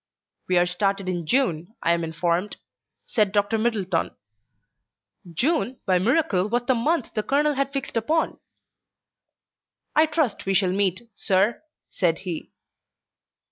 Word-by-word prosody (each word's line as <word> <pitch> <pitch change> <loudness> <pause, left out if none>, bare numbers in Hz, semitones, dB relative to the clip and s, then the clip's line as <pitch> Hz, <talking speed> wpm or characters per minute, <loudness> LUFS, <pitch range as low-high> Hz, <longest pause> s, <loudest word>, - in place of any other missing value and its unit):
"We 185 - +2
are 175 - +5
started 195 +2 -1
in 175 -3 -3
June, 220 - 0
I 170 - +3
am 170 0 +1
informed," 170 +4 -1 0.5
said 210 -4 +1
Dr. 205 +2 +1
Middleton. 200 -7 0 1.2
June, 260 - 0
by 185 -2 +3
miracle, 210 - +2
was 240 +2 0
the 260 - +3
month 265 +3 0
the 215 - 0
colonel 295 +6 +2
had 275 0 -1
fixed 275 -3 -4
upon. 310 +9 0 1.6
"I 310 +1 +5
trust 300 -12 -1
we 195 - +2
shall 185 -1 +3
meet, 195 +1 0
sir," 200 +2 +1 0.3
said 170 -4 0
he. 170 -3 -5
205 Hz, 135 wpm, -24 LUFS, 180-255 Hz, 1.6 s, are